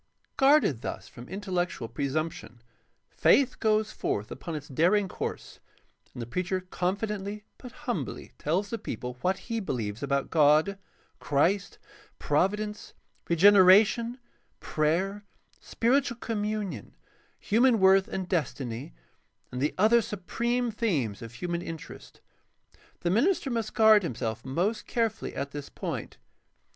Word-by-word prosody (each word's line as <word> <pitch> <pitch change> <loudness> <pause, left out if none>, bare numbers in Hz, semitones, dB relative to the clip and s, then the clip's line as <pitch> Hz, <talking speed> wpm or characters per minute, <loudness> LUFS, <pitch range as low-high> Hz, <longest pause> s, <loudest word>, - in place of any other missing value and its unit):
Guarded 270 - +4
thus - - -5
from 120 0 -12
intellectual 180 - -2
pre 130 +5 -3
PRACTICAL 155 +4 +1
THEOLOGY 120 -7 -9 0.5
587 275 - +5
sumption, - - -17
faith 255 - -21
goes 215 0 +2
forth 105 - -3
upon 160 +4 -6
its 145 -1 -6
daring 180 +9 +2
course, - - -6 0.5
and 120 - -5
the - - -5
preacher 180 +8 -2
confidently 200 +2 -2 0.2
but 250 - -10
humbly - - -4
tells 185 +7 -1
the 230 - -3
people 125 - -6
what 185 +1 +1
he 230 -1 -4
believes 115 - -3
about 140 0 -1
God, 155 +5 +4 0.4
Christ, 175 +8 +1 0.4
Providence, 210 +7 -1 0.3
regeneration, 205 +6 +6 0.4
prayer, 185 +7 0 0.4
spiritual 245 0 +1
communion, 210 - -3 0.4
human 235 +2 +3
worth 190 0 +5
and 190 -1 -4
destiny, 130 - -3 0.6
and 125 - -4
the 145 - 0
other 220 +4 +5
supreme 235 +3 -2
themes 160 - -1
of 115 0 -9
human 170 +7 -3
interest. 165 -3 -9 0.8
The 175 - 0
minister 295 - +2
must 230 -2 -3
guard 220 -2 +7
himself 115 - -3
most 180 +12 -1
carefully 230 -3 -1
at 140 0 -4
this 145 -1 -7
point. - - -5
190 Hz, 130 wpm, -28 LUFS, 145-215 Hz, 0.8 s, guard